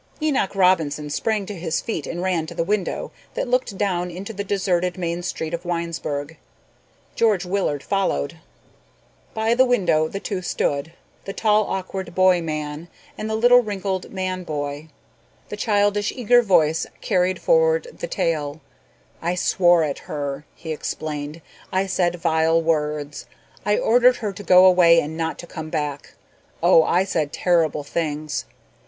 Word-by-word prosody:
Enoch 275 - 0
Robinson 160 -6 +2
sprang 215 +5 -1
to 205 - -6
his 170 -3 -2
feet 165 - -4
and 175 +1 -4
ran 175 -4 0
to 170 - -8
the 165 - 0
window 200 +1 -2 0.2
that - - -2
looked 245 -5 0
down 180 -3 0
into 190 +5 -7
the 200 0 -4
deserted 185 -2 0
main 170 -1 -2
street 160 -2 -4
of 170 +1 -3
Winesburg. 165 -3 -3 0.8
George 210 -5 +2
Willard 180 -7 -1
followed. 190 - -1 1.0
By 220 +1 +2
the 255 +2 +5
window 185 -11 +2
the 195 - -5
two 195 -2 -4
stood, 155 -3 -2 0.3
the 195 - -5
tall 215 -1 +2
awkward 190 -1 -4
boy 185 -1 +4
man 155 0 -4 0.3
and 215 - -5
the 220 - -1
little 245 +2 +6
wrinkled 195 -4 -3
man 185 -1 -3
boy. 145 -1 -4 0.6
The - - -4
childish, 205 -1 +1
eager 245 0 +4
voice 160 -7 +2
carried 185 -2 +1
forward 485 0 +3
the - - -3
tale. 155 - -1 0.6
"I 175 +2 -1
swore 175 -2 +3
at 145 -2 -2
her," 145 -1 -4
he 160 - -7
explained. 150 0 -5 0.3
"I 190 +1 +1
said 175 -2 0
vile 165 -1 +2
words. 150 -2 -2 0.4
I 210 0 +2
ordered 245 +2 +4
her 210 -5 -4
to 195 - -9
go 185 -2 +6
away 175 -2 +6
and 155 0 -4
not 165 0 -2
to - - -8
come 160 -2 -7
back. 150 -3 -4 0.5
Oh, 165 - +7
I 175 +3 +2
said 155 -6 -1
terrible 165 -5 +1
things. 150 - -3
175 Hz, 155 wpm, -22 LUFS, 155-200 Hz, 1.0 s, Oh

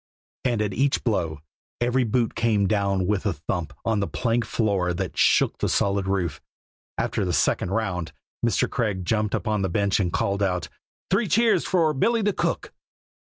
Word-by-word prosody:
And 120 -4 +1
at 100 -2 -2
each 135 +6 +1
"blow" 80 - -1 0.4
every 125 +1 +2
boot 115 0 0
came 110 -4 +2
down 100 -3 +1
with 105 +1 0
a 100 - +1
thump 80 +1 -4
on 110 -2 +1
the 100 - 0
plank 120 -1 0
floor 100 -6 0
that - - -4
shook - - +3
the - - 0
solid 100 -1 +1
roof. 90 -6 -1 0.6
After - - -1
the 90 -2 -1
second 85 - +1
round 95 -5 -2 0.3
Mr. 115 -2 +2
Craig 100 -6 -2
jumped 105 +1 0
upon 110 -2 -1
the 95 - 0
bench 100 +2 +1
and 90 -3 0
called 100 +3 0
out: 90 -3 0 0.4
"Three 205 +3 +2
cheers 225 +4 +3
for 165 -4 +2
Billy 225 - +1
the 205 0 +2
cook!" - - -2
105 Hz, 175 wpm, -24 LUFS, 95-120 Hz, 0.6 s, shook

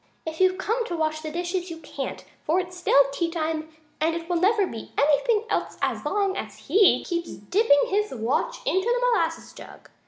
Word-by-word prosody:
"If 320 0 -5
you've 370 0 +4
come 450 +5 -1
to 345 - -3
wash 310 -1 -1
the 310 - -5
dishes 350 +3 -3
you 330 - -6
can't, 325 - -6 0.2
for 330 +4 +2
it's 360 0 -5
still 280 -6 +4
tea 335 +4 -1
time 315 -1 -3 0.3
and 325 +1 +2
it 335 -1 -5
never 380 +5 +3
will 370 - -3
be 225 - -9
anything 410 - +3
else - - -2
as - - -1
long 395 -2 0
as - - -6
he 405 -1 +4
keeps 340 -1 -3
dipping 285 - +3
his 420 +2 0
watch 260 - -1
in 375 - +2
the 480 +4 0
molasses 330 -7 -1
jug! - - -13
345 Hz, 195 wpm, -25 LUFS, 315-395 Hz, 0.3 s, you've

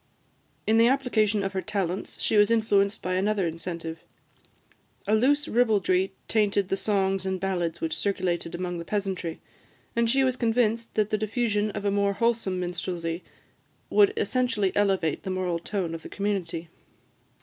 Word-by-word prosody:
In 220 +1 +4
the 230 - +6
application 220 -6 +2
of 195 0 -2
her 190 - -1
talents 195 -3 -3
she - - +1
was 205 0 +6
influenced 215 -2 +2
by 185 - -1
another 195 +1 +1
incentive. 165 0 -5 1.1
A 210 - +2
loose 285 +7 +3
ribaldry 200 -5 +2 0.2
tainted 205 -3 +1
the - - +1
songs 195 -2 0
and 190 -1 -2
ballads 175 -3 -2
which 160 - -1
circulated 175 -4 -1
among 175 -1 -3
the - - -5
peasantry, 190 -3 -3 0.6
and 235 0 +2
she 270 +3 +3
was 255 -1 +2
convinced 230 -1 +1
that 215 -1 +1
the 215 - +1
diffusion 215 -1 0
of 205 -1 -5
a 200 - +2
more 200 0 +2
wholesome 225 -4 0
minstrelsy 175 -1 -3 0.7
would 410 -1 +6
essentially 240 - 0
elevate 195 -6 +1
the - - -6
moral 185 -2 -1
tone 175 -1 -3
of 165 - -5
the - - -10
community. 190 -5 -2
200 Hz, 160 wpm, -26 LUFS, 180-220 Hz, 1.1 s, the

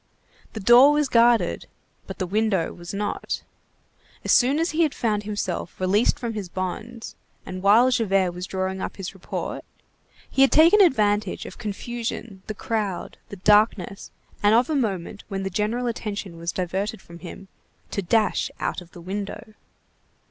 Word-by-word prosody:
The 220 - -5
door 240 +7 +7
was 295 -1 +2
guarded, 235 -1 +3 0.4
but - - -7
the 185 - -2
window 195 -2 0
was 175 0 -9
not. 205 +1 -3 0.8
As - - +2
soon 265 +3 +4
as 330 +2 0
he 315 +2 0
had 310 -4 +2
found 215 -3 0
himself 205 -5 -4
released 190 +5 +2
from 235 -2 -4
his 205 -4 -5
bonds, 215 +6 -5 0.3
and 185 0 -6
while 225 +6 +5
Javert 195 -6 +2
was 180 +1 -6
drawing 190 0 -3
up - - -4
his 195 -2 -6
report, 190 - -5 0.6
he 270 - 0
had 270 - +6
taken 335 +7 +7
advantage 210 - +2
of - - -10
confusion, 225 -1 -5
the 215 - -4
crowd, 205 -4 -3
the - - -7
darkness, 205 -1 +2 0.3
and 205 +1 +5
of 245 +6 +3
a - - +1
moment 200 -7 -2
when 195 -2 -4
the 195 - -3
general 215 +6 -1
attention 210 -6 -4
was 170 +1 -3
diverted 190 +4 -3
from 170 0 -13
him, 190 +2 -10 0.4
to 200 - -1
dash 215 +4 +1
out - - -2
of 175 -1 -16
the 175 - -11
window. 205 +4 -6
210 Hz, 165 wpm, -24 LUFS, 190-235 Hz, 0.8 s, door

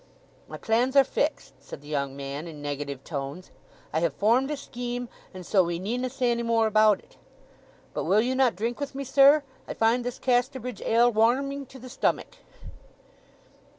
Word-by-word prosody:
"My - - -8
plans 245 +4 0
are 275 - +8
fixed," 285 +3 -2
said - - -10
the 145 - -15
young 140 -2 -3
man, 140 +3 -6
in 155 -3 -9
negative 145 -2 -5
tones. 145 +4 -6 0.4
"I 160 - +2
have 165 -4 0
formed 235 - +2
a 300 - -2
scheme, 245 -2 -5 0.2
and 185 -1 -10
so 190 0 +3
we 170 0 -2
need 220 +8 -3
na 255 - -1
say 250 -1 0
any 235 0 -1
more 230 -1 +2
about 215 0 +4
it. - - -23 0.8
But - - -3
will 205 +3 +4
you 250 +3 0
not 260 -2 +2
drink 230 +6 -3
with 285 -1 -5
me, 275 - -3
sir? 280 +3 +5 0.2
I - - -5
find 230 +2 +2
this 245 0 -4
Casterbridge 250 -2 -1
ale 235 +2 +3
warreming 265 +5 +1
to 265 - -13
the 255 0 -11
stomach." 245 - -2
235 Hz, 185 wpm, -26 LUFS, 180-255 Hz, 0.8 s, are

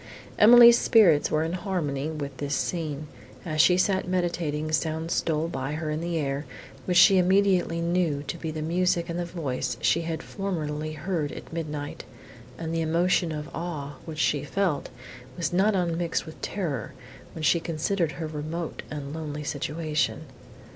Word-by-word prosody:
Emily's 235 +2 +9
spirits 180 -10 +5
were 155 0 +1
in 165 +1 -2
harmony 160 -7 -2
with 145 -3 -5
this 145 0 -2
scene. 155 -4 -2 0.4
As 155 -2 +2
she 180 - +5
sat 190 0 +1
meditating, 170 -4 -1
sounds 160 +1 -1
stole 160 0 0
by 135 -2 -4
her 155 0 -3
on 155 +1 -2
the 170 0 -2
air, 140 -1 -2 0.4
which 180 -1 +1
she 190 +1 +7
immediately 185 -2 +2
knew 170 -4 0
to 145 - -5
be 165 -1 -5
the 155 0 -4
music 175 +1 +1
and 170 +1 -3
the 175 - -1
voice 160 -7 -3
she 170 - +2
had 165 -1 -4
formerly 155 -6 -3
heard 155 -1 -2
at - - -10
midnight, 150 -3 -5 0.5
and 165 0 -4
the 165 - 0
emotion 170 +1 +2
of 150 0 -5
awe, 150 -5 -5
which 160 -2 -7
she 145 -2 +1
felt, 175 +1 -1 0.5
was 170 - -2
not 195 +3 +3
unmixed 170 -2 -1
with 160 - -11
terror, 155 - -3 0.4
when 160 - -6
she 170 +3 +4
considered 165 +1 -1
her 165 - -5
remote 155 +2 -5
and 145 -1 -6
lonely 150 -2 -5
situation. 150 +2 -2
160 Hz, 165 wpm, -26 LUFS, 150-175 Hz, 0.5 s, Emily's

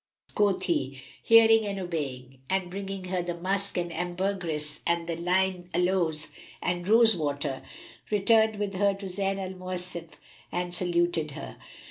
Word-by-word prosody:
Quoth 205 -2 +2
he, 135 -6 -1 0.2
"Hearing 225 -1 +7
and 200 -1 -3
obeying," 135 -8 -4
and 190 -2 0
bringing 195 0 -5
her 185 0 -1
the 175 0 -3
musk 195 +2 -1
and 175 -1 -2
ambergris 175 -4 -2
and 170 0 0 0.2
lign 180 0 +1
aloes 175 -4 +1 0.3
and 175 +1 -2
rose 225 -1 +7
water, 145 -3 -2 0.5
returned 220 +1 +4
with 205 -1 -2
her 200 +1 +2
to 195 0 -8
Zayn 195 +1 -1
al 190 -1 -4
Mawasif 180 -2 -4 0.4
and 175 0 -2
saluted 175 -3 +1
her. - - -8
180 Hz, 140 wpm, -28 LUFS, 170-195 Hz, 0.5 s, Hearing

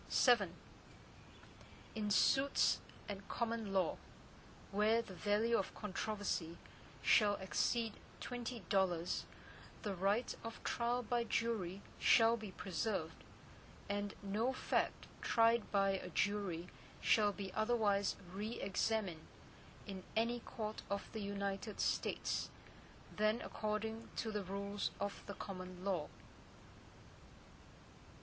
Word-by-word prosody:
VII 240 -6 +5 1.5
In 215 -2 -1
suits 270 +7 +4 0.3
at 200 -1 -6
common 230 -3 -1
law, 190 -2 +2 0.7
where 210 +3 +4
the 225 -5 -5
value 210 +4 +2
in - - +2
controversy 200 -5 -2 0.5
shall 205 -2 +6
exceed 220 +4 0 0.3
twenty 245 -1 -4
dollars, 180 -2 +1 0.6
the 205 - -1
right 200 +6 +1
of 230 - -7
trial 240 +1 +1
by 240 +1 +1
jury 210 -5 -1 0.2
shall 230 0 +6
be 220 -3 -6
preserved, 185 -2 -2 0.6
and 205 0 -2
no 210 +6 +1
fact 265 - 0 0.2
tried 230 0 +4
by 195 -1 +4
a 190 -1 -3
jury 185 -3 0 0.3
shall 210 -2 +4
be 195 -2 -6
otherwise 215 -3 +2 0.2
re 210 +4 -3
examined 195 -4 0 0.6
in 190 -2 -6
any 235 +2 +2
court 215 -2 -5
of 200 0 -3
the 220 - -3
United 200 +1 -3
States, - - 0 0.7
than 215 +2 +3
according 220 +1 -3
to 220 - -1
the 210 -1 -2
rules 200 +2 -2
of 200 - -3
the 200 - -5
common 185 -1 -7
law. 180 -7 0
205 Hz, 110 wpm, -38 LUFS, 195-225 Hz, 1.5 s, shall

